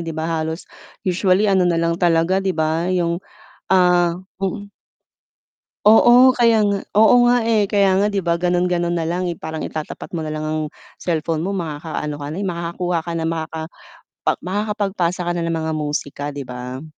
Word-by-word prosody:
'di 165 Hz, -1 st, -5 dB
ba, 160 Hz, -, -2 dB, 0.2 s
halos 160 Hz, +2 st, -4 dB, 0.4 s
usually 185 Hz, +2 st, +2 dB
ano 190 Hz, -3 st, +3 dB
na 170 Hz, -, +1 dB
lang 170 Hz, +1 st, 0 dB
talaga, 175 Hz, +2 st, +2 dB
'di 190 Hz, -3 st, -2 dB
ba, 160 Hz, +2 st, 0 dB
'yong 175 Hz, -1 st, 0 dB, 0.5 s
ah, 180 Hz, -2 st, +4 dB, 0.3 s
mm. 200 Hz, +2 st, -4 dB, 1.2 s
Oo 240 Hz, +4 st, +7 dB
kaya 230 Hz, -3 st, +3 dB
nga, 200 Hz, -1 st, +1 dB, 0.2 s
oo 220 Hz, +2 st, +6 dB
nga 245 Hz, -2 st, +3 dB
eh, 215 Hz, -3 st, +2 dB
kaya 200 Hz, -2 st, +3 dB
nga 205 Hz, -, +3 dB
'di 200 Hz, -1 st, -1 dB
ba, 170 Hz, 0 st, 0 dB
gano'n 180 Hz, 0 st, +1 dB
gano'n 175 Hz, -1 st, 0 dB
na 165 Hz, -, -1 dB
lang 175 Hz, +2 st, -1 dB
eh, 170 Hz, -, -3 dB
parang 160 Hz, 0 st, -6 dB
itatapat 155 Hz, +3 st, -7 dB
mo 160 Hz, -, -3 dB
na 155 Hz, -, -4 dB
lang 155 Hz, 0 st, -4 dB
ang 155 Hz, 0 st, -1 dB, 0.4 s
cellphone 160 Hz, -1 st, -2 dB
mo 195 Hz, -, -2 dB
makaka-ano 155 Hz, -3 st, -4 dB
ka 145 Hz, 0 st, -7 dB
na 160 Hz, -, -6 dB
eh, 200 Hz, -, -2 dB
makakakuha 170 Hz, 0 st, -2 dB
ka 170 Hz, -, -4 dB
na, 160 Hz, -, -2 dB
makaka 160 Hz, -1 st, -4 dB, 0.8 s
makakapagpasa 195 Hz, -2 st, -1 dB
ka 175 Hz, 0 st, -1 dB
na 170 Hz, -, -2 dB
ng 165 Hz, -, -1 dB
mga 160 Hz, 0 st, -2 dB
musika, 145 Hz, -1 st, -3 dB
'di 140 Hz, -, -5 dB
ba? 125 Hz, +3 st, -7 dB
175 Hz, 185 wpm, -20 LUFS, 160-195 Hz, 1.2 s, Oo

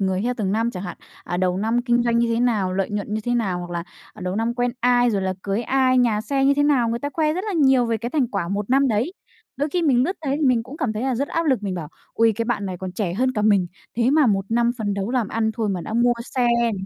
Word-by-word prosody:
người 190 Hz, -1 st, 0 dB
theo 245 Hz, +2 st, 0 dB
từng 195 Hz, -4 st, -1 dB
năm, 225 Hz, +2 st, +1 dB
chẳng 185 Hz, -5 st, -6 dB
hạn, 180 Hz, -3 st, -6 dB, 0.3 s
à, 175 Hz, -, -3 dB
đầu 180 Hz, 0 st, +1 dB
năm 225 Hz, +5 st, 0 dB
kinh 240 Hz, -1 st, +2 dB
doanh 235 Hz, -1 st, +1 dB
như 235 Hz, 0 st, +2 dB
thế 230 Hz, -, 0 dB
nào, 215 Hz, -7 st, +1 dB
lợi 195 Hz, +1 st, -1 dB
nhuận 205 Hz, 0 st, -3 dB
như 215 Hz, -, -1 dB
thế 245 Hz, -, 0 dB
nào, 200 Hz, -7 st, 0 dB
hoặc 175 Hz, 0 st, -7 dB
là, 170 Hz, -1 st, -3 dB, 0.3 s
ờ, -, -, -14 dB
đầu 185 Hz, +1 st, -2 dB
năm 230 Hz, +2 st, 0 dB
quen 245 Hz, 0 st, 0 dB
ai, 245 Hz, 0 st, +3 dB
rồi 200 Hz, -3 st, -1 dB
là 190 Hz, 0 st, -1 dB
cưới 200 Hz, +3 st, -1 dB
ai, 255 Hz, +1 st, +2 dB
nhà 230 Hz, -4 st, +2 dB
xe 270 Hz, +5 st, 0 dB
như 280 Hz, +1 st, +4 dB
thế 290 Hz, -, +2 dB
nào, 275 Hz, -5 st, +3 dB
người 230 Hz, -, -1 dB
ta 285 Hz, -, -3 dB
khoe 305 Hz, +1 st, +1 dB
rất 365 Hz, +5 st, -3 dB
là 425 Hz, -, -3 dB
nhiều 265 Hz, -7 st, +4 dB
về 230 Hz, -1 st, 0 dB
cái 235 Hz, +2 st, -5 dB
thành 280 Hz, -4 st, +1 dB
quả 200 Hz, -7 st, -3 dB
một 200 Hz, +3 st, -3 dB
năm 270 Hz, +1 st, +4 dB
đấy. 230 Hz, -, 0 dB, 0.4 s
Đôi 290 Hz, +2 st, -1 dB
khi 350 Hz, +3 st, -1 dB
mình 260 Hz, -6 st, +3 dB
lướt 370 Hz, +6 st, -2 dB
thấy 275 Hz, 0 st, 0 dB
thì 310 Hz, -, -3 dB
mình 245 Hz, -3 st, +3 dB
cũng 260 Hz, +5 st, -10 dB
cảm 255 Hz, -7 st, -1 dB
thấy 215 Hz, +2 st, -4 dB
là 260 Hz, -1 st, 0 dB
rất 280 Hz, +4 st, -2 dB
áp 330 Hz, 0 st, -1 dB
lực, 260 Hz, -7 st, +2 dB
mình 195 Hz, -2 st, -2 dB
bảo: 165 Hz, -4 st, -5 dB, 0.3 s
"Ôi, 225 Hz, 0 st, +4 dB
cái 230 Hz, -, -1 dB
bạn 230 Hz, -4 st, -2 dB
này 185 Hz, -1 st, -4 dB
còn 185 Hz, 0 st, -5 dB
trẻ 180 Hz, -2 st, -2 dB
hơn 255 Hz, +5 st, +1 dB
cả 210 Hz, -4 st, -1 dB
mình, 200 Hz, -4 st, +3 dB, 0.3 s
thế 240 Hz, +2 st, +2 dB
mà 300 Hz, -1 st, +4 dB
một 195 Hz, -3 st, +1 dB
năm 235 Hz, +1 st, +2 dB
phấn 205 Hz, -2 st, -1 dB
đấu 200 Hz, +2 st, -3 dB
làm 245 Hz, -5 st, 0 dB
ăn 220 Hz, -1 st, 0 dB
thôi 225 Hz, -2 st, -1 dB
mà 190 Hz, -3 st, -2 dB
đã 195 Hz, -, -6 dB
mua 240 Hz, +1 st, +4 dB, 0.2 s
xe 250 Hz, -2 st, +2 dB
nè, 235 Hz, -1 st, +1 dB
230 Hz, 310 wpm, -22 LUFS, 200-255 Hz, 0.4 s, như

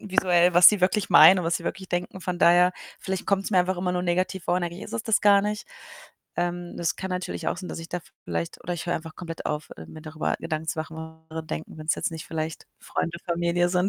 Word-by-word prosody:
visuell, 180 Hz, -3 st, +3 dB
was 175 Hz, 0 st, +10 dB
sie 210 Hz, -2 st, +1 dB
wirklich 185 Hz, +3 st, +1 dB
meinen 175 Hz, +5 st, +9 dB
und -, -, -4 dB
was 165 Hz, +1 st, +1 dB
sie 170 Hz, -, -10 dB
wirklich 190 Hz, -1 st, -4 dB
denken. 175 Hz, +1 st, -3 dB
Von 180 Hz, -1 st, -3 dB
daher, 175 Hz, +1 st, +5 dB, 0.3 s
vielleicht 190 Hz, -1 st, -4 dB
kommt's 195 Hz, +1 st, 0 dB
mir 190 Hz, -, +4 dB
einfach 180 Hz, +1 st, +1 dB
immer 180 Hz, 0 st, -1 dB
nur 180 Hz, 0 st, -1 dB
negativ 185 Hz, +1 st, -1 dB
vor -, -, +1 dB
und 180 Hz, -, -1 dB
eigentlich 175 Hz, +2 st, -4 dB
ist -, -, -10 dB
es 230 Hz, -, -2 dB
das 225 Hz, -2 st, +2 dB
gar 200 Hz, -1 st, +6 dB
nicht. 210 Hz, +1 st, -3 dB, 0.7 s
Ähm, 175 Hz, 0 st, -3 dB
das 170 Hz, -1 st, -1 dB
kann 190 Hz, -, -5 dB
natürlich 180 Hz, 0 st, -3 dB
auch -, -, -2 dB
sein, 180 Hz, -, -7 dB
dass 165 Hz, -, -6 dB
ich 165 Hz, -, -9 dB
da 175 Hz, -, -3 dB, 0.2 s
vielleicht 85 Hz, -1 st, -4 dB
oder 175 Hz, -, -3 dB
ich 175 Hz, -, -6 dB
höre 175 Hz, -, 0 dB
einfach 160 Hz, -1 st, -6 dB
komplett 165 Hz, -2 st, -7 dB
auf, 150 Hz, +1 st, -3 dB
äh, 80 Hz, -, -10 dB
mir 155 Hz, -, -11 dB
darüber 155 Hz, -1 st, -2 dB
Gedanken 160 Hz, -1 st, -4 dB
zu -, -, -2 dB
machen 160 Hz, 0 st, -5 dB
was 160 Hz, 0 st, -8 dB
andere 160 Hz, 0 st, -5 dB
denken, 160 Hz, 0 st, -6 dB
wenn's 155 Hz, 0 st, 0 dB
jetzt -, -, -2 dB
nicht 160 Hz, -1 st, -7 dB
vielleicht 160 Hz, 0 st, -4 dB
Freunde, 170 Hz, +1 st, -3 dB
Familie 170 Hz, 0 st, +1 dB
sind. 180 Hz, +1 st, +1 dB
175 Hz, 255 wpm, -25 LUFS, 160-185 Hz, 0.7 s, was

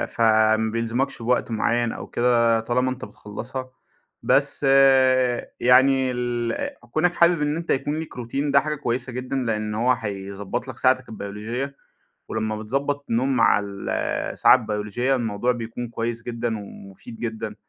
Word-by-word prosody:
فَما 110 Hz, -1 st, +3 dB
بيلزمكش 115 Hz, +4 st, -2 dB
بوقت 120 Hz, 0 st, 0 dB
معين 115 Hz, +1 st, +1 dB
أو -, -, -7 dB
كده 115 Hz, -2 st, +2 dB
طالما 125 Hz, +3 st, 0 dB
أنت 130 Hz, 0 st, -6 dB
بتّخلصها، 130 Hz, +5 st, -7 dB, 0.5 s
بس -, -, +2 dB, 1.0 s
يعني 130 Hz, +1 st, +4 dB
ال 120 Hz, -1 st, -2 dB, 0.2 s
كونَك 175 Hz, +5 st, +2 dB
حابب 170 Hz, -2 st, +4 dB
إن 150 Hz, +1 st, 0 dB
أنت 170 Hz, 0 st, -7 dB
يكون 145 Hz, +3 st, -1 dB
ليك 160 Hz, -, -7 dB
روتين 135 Hz, +4 st, -2 dB
ده 140 Hz, -, +6 dB
حاجة 150 Hz, +1 st, -2 dB
كويسة 125 Hz, -2 st, -3 dB
جدًا 125 Hz, +2 st, -4 dB
لأن 110 Hz, -4 st, -1 dB
هو 120 Hz, +4 st, +2 dB
هيضبطلك 100 Hz, +2 st, -4 dB
ساعتك 130 Hz, -1 st, +2 dB
البيولوجية، 110 Hz, +6 st, -5 dB, 0.5 s
ولما 110 Hz, -1 st, -2 dB
بتضبط 140 Hz, +6 st, -2 dB
النوم 130 Hz, +4 st, +1 dB
مع 105 Hz, -2 st, +4 dB
ال 100 Hz, -1 st, -6 dB, 0.4 s
الساعة -, -, +6 dB
البيولوجية 110 Hz, +3 st, -1 dB
الموضوع 120 Hz, 0 st, 0 dB
بيكون 120 Hz, 0 st, -5 dB
كويس 115 Hz, 0 st, -3 dB
جدًا، 115 Hz, -1 st, -3 dB
ومُفيد 100 Hz, +2 st, -11 dB
جدًا. 110 Hz, -2 st, -4 dB
120 Hz, 140 wpm, -23 LUFS, 110-130 Hz, 1.0 s, ده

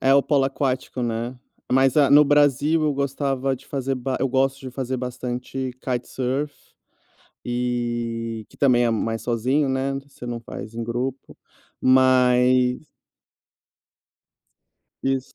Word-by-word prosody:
É, 135 Hz, +1 st, +4 dB
o 140 Hz, -, +5 dB
polo 140 Hz, -2 st, +2 dB
aquático, 135 Hz, -2 st, -2 dB
né, 120 Hz, +2 st, -3 dB, 0.3 s
mas 135 Hz, +2 st, +3 dB
a 145 Hz, -3 st, +5 dB
no 150 Hz, +1 st, +8 dB
Brasil 145 Hz, +2 st, +3 dB
eu 150 Hz, -, +2 dB
gostava 135 Hz, -1 st, -1 dB
de 130 Hz, -, -19 dB
fazer 135 Hz, -1 st, -2 dB
ba 130 Hz, 0 st, -3 dB
eu 135 Hz, -, +1 dB
gosto 135 Hz, +1 st, +1 dB
de 130 Hz, -, -7 dB
fazer 130 Hz, 0 st, -3 dB
bastante 125 Hz, +1 st, -4 dB
kitesurf 130 Hz, +3 st, -2 dB, 0.9 s
e 120 Hz, -2 st, -2 dB
que -, -, -20 dB
também 125 Hz, -3 st, +4 dB
é 120 Hz, -, +2 dB
mais 115 Hz, 0 st, -1 dB
sozinho, 125 Hz, +5 st, +1 dB
né, 130 Hz, +1 st, 0 dB
você 135 Hz, -3 st, -13 dB
não 120 Hz, -1 st, -4 dB
faz 115 Hz, -1 st, -9 dB
em 115 Hz, -, -4 dB
grupo 125 Hz, +3 st, -4 dB, 0.4 s
mas 125 Hz, +1 st, +4 dB, 2.2 s
Isso, 135 Hz, -1 st, -1 dB
130 Hz, 135 wpm, -23 LUFS, 120-135 Hz, 2.2 s, no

